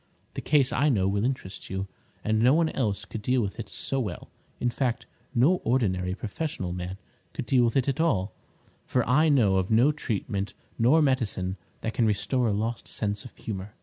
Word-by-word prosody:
The - - -4
case 140 -3 +3
I 150 +2 +3
know 100 -8 +2
will 100 +1 0
interest 125 -7 -3
you, 95 +1 -3 0.4
and 110 0 +1
no 125 +5 +5
one 165 -1 +3
else 105 -7 -1
could 110 +1 -6
deal 125 +4 +2
with 100 +2 -4
it 105 -3 -5
so 135 - -3
well. 105 -9 -4 0.3
In 120 - +1
fact, 120 -2 -1 0.3
no 145 +10 +5
ordinary 95 - 0
professional 105 - -3
man 90 +1 -5 0.4
could - - -4
deal 125 -1 +4
with 115 +4 +1
it 135 - +1
at 140 +3 +1
all, 105 - +1 0.5
for 125 -2 +1
I 150 +6 +4
know 110 -10 +4
of 95 0 0
no 120 +7 +5
treatment 105 -7 -3 0.2
nor 140 +8 +5
medicine 105 -9 0 0.3
that 110 - -2
can 115 - +2
restore 105 +4 +1
a - - +2
lost 110 +3 -2
sense 105 0 -2
of 125 - -12
humour!" 100 -1 -6
115 Hz, 195 wpm, -27 LUFS, 100-130 Hz, 0.5 s, no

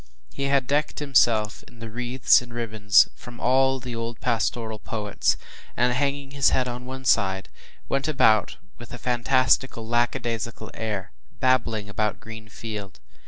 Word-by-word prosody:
He 140 - -3
had 140 -1 +2
decked 145 +3 0
himself 115 -7 +2
in 120 - -17
wreaths 120 +4 +2
and 120 -1 -12
ribbons 110 -4 +3
from 120 -1 -12
all 130 +1 +3
the 125 -1 -6
old 115 0 -5
pastoral 115 -2 -1
poets, 105 -2 -1 0.4
and, 125 +1 +3
hanging 140 +1 -1
his 140 -1 +3
head 130 -1 +1
on 125 +1 -6
one 130 0 -7
side, 95 -5 +2 0.4
went 135 +1 -1
about 110 -9 +3 0.2
with - - -11
a - - -8
fantastical, 125 -1 +1
lackadaisical 120 -1 -2
air, 110 -2 -4 0.3
“babbling 115 -5 +1
about 105 0 -2
green 110 -2 -10
field. 105 -8 -7
120 Hz, 145 wpm, -25 LUFS, 110-130 Hz, 0.4 s, ribbons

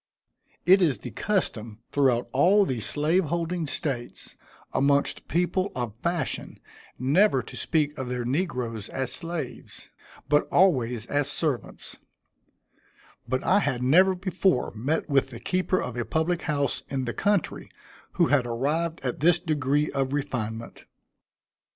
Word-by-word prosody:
It 190 +3 +6
is 155 -7 +3
the - - -8
custom 115 - -2
throughout 130 -4 +2
all 190 +9 +4
the 130 -8 -2
slave 155 - +1
holding 170 +1 -2
States, 135 -5 -4 0.4
amongst 140 +1 +1
people 180 +3 0
of 120 -4 -3
fashion, 170 -5 -2 0.4
never 135 - +3
to - - -11
speak 150 -2 0
of 130 -2 -4
their 125 -1 -2
negroes 125 - -2
as 130 -2 -3
slaves, 170 -1 -6 0.4
but 150 +1 +3
always 125 - +3
as 145 +2 0
servants; 145 -4 -3 1.3
but 130 +2 -1
I 195 +3 +4
had 125 -10 -1
never 185 +8 +5
before 185 -5 0
met 135 +9 -1
with 140 -2 +2
the 120 -3 -9
keeper 185 +4 0
of 125 - -4
a 120 - -1
public 160 +8 0
house, 145 -3 -1
in 135 -2 -2
the 120 - -3
country, 205 -4 0 0.4
who 175 - +3
had 140 -5 +2
arrived 155 +8 -1
at 125 -2 -3
this 170 +3 +4
degree 150 -3 0
of 135 -1 -1
refinement. 115 -6 -4
145 Hz, 140 wpm, -26 LUFS, 125-170 Hz, 1.3 s, It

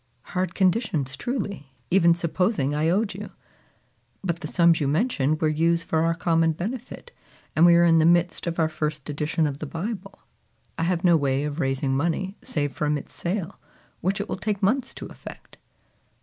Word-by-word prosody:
"Hard 185 -1 -1
conditions 180 - +1
truly, 200 - -4 0.2
even 170 -2 +5
supposing 170 - 0
I 155 +2 +1
owed 200 +4 +1
you! - - -7 0.9
But 170 -3 -1
the 155 - -5
sums 170 0 +3
you 145 - +1
mention 155 - +1
were 155 - +1
used 165 +2 +2
for 160 -1 +1
our 165 0 +1
common 165 -1 +2
benefit, 240 - -6 0.4
and 165 +2 +6
we 170 - +7
are 170 0 +5
in 165 -1 +5
the 160 - +4
midst 175 +1 +2
of 170 - -2
our 160 - +3
first 150 -2 -3
edition 150 +2 0
of 145 -1 -3
the 155 - -5
Bible. 195 +5 -5 0.6
I 165 - -1
have 175 0 0
no 175 -2 +6
way 140 -2 +1
of 150 +1 -4
raising 135 -1 0
money 170 +6 -1
save 145 -2 -2
from 150 +1 0
its 145 - -10
sale, 185 +1 -3 0.4
which 195 +3 -1
it 205 - -3
will - - -3
take 210 -2 -3
months 260 +6 +1
to - - -7
effect." - - -12
165 Hz, 185 wpm, -25 LUFS, 150-190 Hz, 0.9 s, we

